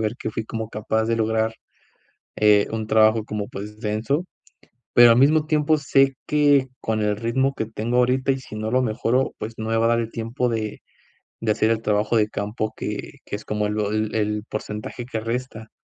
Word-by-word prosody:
ver 110 Hz, +1 st, -1 dB
que 110 Hz, -, -4 dB
fui 110 Hz, -, -4 dB
como 110 Hz, 0 st, -5 dB
capaz 110 Hz, +1 st, -1 dB
de 115 Hz, -, +1 dB
lograr, 110 Hz, 0 st, 0 dB, 0.8 s
eh, 105 Hz, -1 st, +4 dB
un 110 Hz, -1 st, -3 dB
trabajo 110 Hz, 0 st, +4 dB
como, 105 Hz, -2 st, -4 dB
pues, 105 Hz, +2 st, -8 dB
denso, 110 Hz, +10 st, -1 dB, 0.7 s
pero 120 Hz, -1 st, +8 dB
al 115 Hz, -, +5 dB
mismo 150 Hz, +3 st, +4 dB
tiempo, 155 Hz, 0 st, +2 dB
sé 135 Hz, -2 st, +3 dB
que 145 Hz, -3 st, +4 dB
con 110 Hz, -1 st, -1 dB
el 105 Hz, 0 st, +1 dB
ritmo 120 Hz, +5 st, 0 dB
que 110 Hz, -, -2 dB
tengo 115 Hz, +2 st, -2 dB
ahorita 130 Hz, +2 st, +2 dB
y 135 Hz, -, -1 dB
si 120 Hz, -5 st, -10 dB
no 110 Hz, +1 st, -3 dB
lo 130 Hz, +1 st, +3 dB
mejoro, 120 Hz, +2 st, 0 dB
pues, 110 Hz, +2 st, -6 dB
no 110 Hz, 0 st, -4 dB
me 115 Hz, -, +1 dB
va 115 Hz, -, +2 dB
a -, -, +5 dB
dar 115 Hz, 0 st, +3 dB
el 115 Hz, -1 st, -3 dB
tiempo 115 Hz, +2 st, -2 dB
de 110 Hz, -2 st, -3 dB, 0.6 s
de 110 Hz, -2 st, +2 dB
hacer 110 Hz, -, +1 dB
el 115 Hz, -1 st, +1 dB
trabajo 105 Hz, +2 st, +1 dB
de 105 Hz, -, +3 dB
campo 105 Hz, +1 st, -3 dB
que -, -, -5 dB
que 100 Hz, -, -5 dB
es -, -, -14 dB
como 105 Hz, 0 st, -1 dB
el 105 Hz, +1 st, -2 dB
o 105 Hz, -1 st, 0 dB
el 110 Hz, 0 st, -1 dB
el 105 Hz, -1 st, -1 dB
porcentaje 105 Hz, +3 st, -5 dB
que 115 Hz, -3 st, -4 dB
resta. 115 Hz, -1 st, -4 dB
110 Hz, 210 wpm, -23 LUFS, 105-125 Hz, 0.8 s, pero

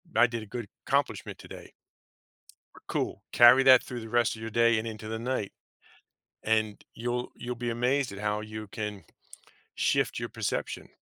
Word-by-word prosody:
I 120 Hz, -, +7 dB
did 115 Hz, -1 st, -4 dB
a -, -, -9 dB
good 115 Hz, 0 st, -6 dB, 0.2 s
accomplishment -, -, 0 dB
today." -, -, -11 dB, 1.2 s
Cool, -, -, -2 dB
carry 120 Hz, +3 st, +8 dB
that 130 Hz, -2 st, +8 dB
through 125 Hz, -, -6 dB
the 115 Hz, -, -8 dB
rest 120 Hz, -1 st, +2 dB
of 110 Hz, -, -11 dB
your 115 Hz, -, -4 dB
day 115 Hz, 0 st, +3 dB
and 115 Hz, -, -4 dB
into 110 Hz, 0 st, -7 dB
the 110 Hz, -, -3 dB
night, 120 Hz, -4 st, -2 dB, 0.9 s
and 110 Hz, -1 st, 0 dB
you'll 120 Hz, +1 st, -3 dB
you'll 125 Hz, 0 st, -4 dB
be 120 Hz, 0 st, -4 dB
amazed 125 Hz, +3 st, +1 dB
at 100 Hz, -, -8 dB
how 105 Hz, 0 st, -1 dB
you 110 Hz, 0 st, -7 dB
can 105 Hz, -1 st, -5 dB, 0.7 s
shift -, -, +1 dB
your -, -, -3 dB
perception. -, -, -3 dB
115 Hz, 170 wpm, -28 LUFS, 110-120 Hz, 1.2 s, carry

